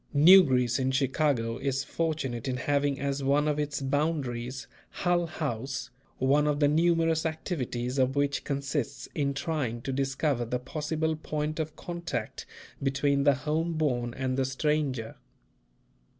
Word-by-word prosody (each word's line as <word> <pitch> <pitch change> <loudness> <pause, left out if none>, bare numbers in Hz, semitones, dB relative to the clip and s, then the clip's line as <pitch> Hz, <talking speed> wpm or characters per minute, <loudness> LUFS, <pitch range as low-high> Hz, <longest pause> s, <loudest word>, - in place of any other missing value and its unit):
New 180 +7 +9
Greece 125 -3 +1
in 130 0 +1
Chicago 130 -3 +1
is 135 -1 -1
fortunate 135 -7 -2
in 130 -1 -1
having 140 +1 0
as 140 0 -2
one 145 +2 +2
of 150 0 0
its 145 -1 -2
boundaries, 135 -3 -1 0.2
Hull 175 -2 0
House, 135 -5 -4 0.3
one 145 +3 +3
of 145 -1 +1
the 145 - +4
numerous 165 +1 +2
activities 135 -6 -3
of 130 +1 +2
which 140 0 0
consists 140 -2 -3
in 140 -2 -1
trying 135 -6 -2
to 135 - -3
discover 135 -1 0
the 120 +1 -2
possible 155 +4 -2
point 155 0 -3
of 155 0 -3
contact 170 -10 -5 0.3
between 140 +1 +1
the 145 -2 +5
home 155 +5 -1
born 125 -7 -1
and 130 -1 -2
the 135 - +2
stranger. 130 -3 -1
140 Hz, 145 wpm, -28 LUFS, 130-155 Hz, 0.3 s, New